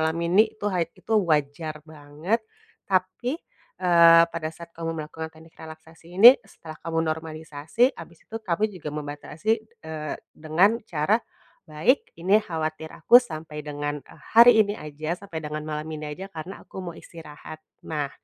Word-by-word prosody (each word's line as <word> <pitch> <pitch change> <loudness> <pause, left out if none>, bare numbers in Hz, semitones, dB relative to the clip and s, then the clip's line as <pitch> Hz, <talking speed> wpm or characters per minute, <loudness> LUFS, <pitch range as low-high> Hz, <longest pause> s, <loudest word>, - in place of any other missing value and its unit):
alami 160 +2 0 0.2
nih 220 - -2
itu 205 - -8
ha 180 - 0
itu 185 +5 -7
wajar 155 0 -1
banget 155 +8 -3 0.5
tapi, 185 +9 0 0.4
eee, 170 -2 +7
pada 160 -1 -3
saat 170 +1 -11
kamu 165 -1 -3
melakukan 160 +1 -6
teknik 160 +1 -17
relaksasi 160 +2 -13
ini, 240 +6 +11
setelah 160 -5 -12
kamu 165 0 -1
normalisasi, 160 - -1
habis 170 - -12
itu 225 - -7
kami 190 +2 +1
juga 170 -5 -7
membatasi, 150 +6 -5 0.3
eee, 155 -1 -5 0.2
dengan 175 +9 +2
cara, 165 +6 +2 0.5
"Baik 155 - +1
ini 200 +5 +4
khawatir 160 -3 -4
aku 240 - +6
sampai 155 -7 -7
dengan, 145 0 -3
eee, - - -18
hari 235 +1 +10
ini 205 - -3
aja, 155 +3 -5
sampai 195 -5 -7
dengan 150 0 -4
malam 150 0 -4
ini 155 0 -6
aja 190 +5 -8
karena 165 +5 -8
aku - - -15
mau - - -11
istirahat." 155 -1 -11 0.3
Nah 150 -3 -2
160 Hz, 155 wpm, -25 LUFS, 155-180 Hz, 0.5 s, ini